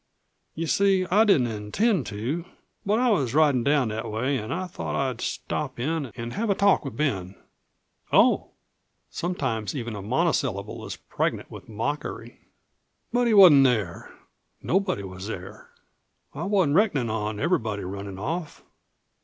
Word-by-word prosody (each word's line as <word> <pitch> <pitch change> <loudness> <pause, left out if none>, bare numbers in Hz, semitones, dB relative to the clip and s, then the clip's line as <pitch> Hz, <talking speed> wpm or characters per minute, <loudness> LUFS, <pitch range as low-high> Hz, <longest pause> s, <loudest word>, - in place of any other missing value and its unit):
You 165 - -2
see, 195 +2 +2
I 215 +4 +5
didn't 155 - +4
intend 140 - 0
to, 125 +11 -3 0.4
but 205 +2 +1
I 250 0 +3
was 140 - 0
ridin' 145 -6 +4
down 140 -3 +2
that 110 +2 -4
way 120 +6 -1
an' 110 +1 -6
I 185 +2 -2
thought 180 - -5
I'd 130 -4 -1
stop 135 -5 -3
in 150 +2 -1
an' 115 0 -5
have 220 - -2
a 200 - +3
talk 200 0 +3
with 135 - -7
Ben." 100 -11 -1 0.8
"Oh!" - - +4 0.6
Sometimes 130 - -2
even 120 -4 -4
a 100 - -6
monosyllable 125 - -1
is - - -5
pregnant - - -3
with - - -11
mockery. 115 +7 -4 0.7
"But 245 0 +2
he 225 - +3
wasn't 160 -9 +9
there. 110 -9 -1 0.5
Nobody 185 - 0
was 95 +1 -8
there. 95 -4 -8 0.6
I - - -4
wasn't 185 -7 +2
reckonin' 145 - +2
on 105 -1 -3
everybody 110 - 0
runnin' 100 +1 -6
off." 155 - -4
135 Hz, 150 wpm, -25 LUFS, 110-180 Hz, 0.8 s, wasn't